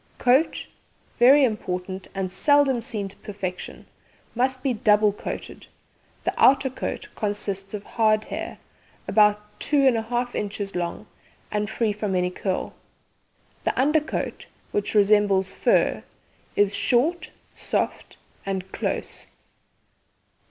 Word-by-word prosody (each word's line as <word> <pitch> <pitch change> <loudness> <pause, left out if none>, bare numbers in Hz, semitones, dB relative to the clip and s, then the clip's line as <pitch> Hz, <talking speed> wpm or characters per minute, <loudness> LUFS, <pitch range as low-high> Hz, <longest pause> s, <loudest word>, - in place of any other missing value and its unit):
COAT 260 +6 +2 0.5
Very 270 +4 +7
important, 190 -5 -2
and 190 -1 -2
seldom 275 +3 +3
seen 210 -3 -3
to 195 - -11
perfection; 190 -3 -6 0.5
must 255 +2 0
be 270 -3 +1
double 210 -1 +3
coated. - - -7 0.6
The - - 0
outer 265 0 +5
coat 260 - -5
consists 205 -2 -2
of 205 - -6
hard 215 -1 +2
hair, - - -6 0.5
about 210 +1 +2
2 295 - +1
1/2 240 +2 -2
inches 200 -1 -3
long, 175 -1 -3 0.5
and 210 0 -1
free 220 -1 0
from 205 -2 -2
any 180 0 +1
curl. 185 0 -3 0.9
The - - -1
under 300 +4 +4
coat, 300 - -4 0.2
which 205 +1 -2
resembles 205 -2 +4
fur, - - +2 0.5
is 205 -1 +3
short, 310 - +1 0.2
soft, - - -3 0.3
and 190 -1 -4
close. - - -4
210 Hz, 115 wpm, -24 LUFS, 195-245 Hz, 0.9 s, Very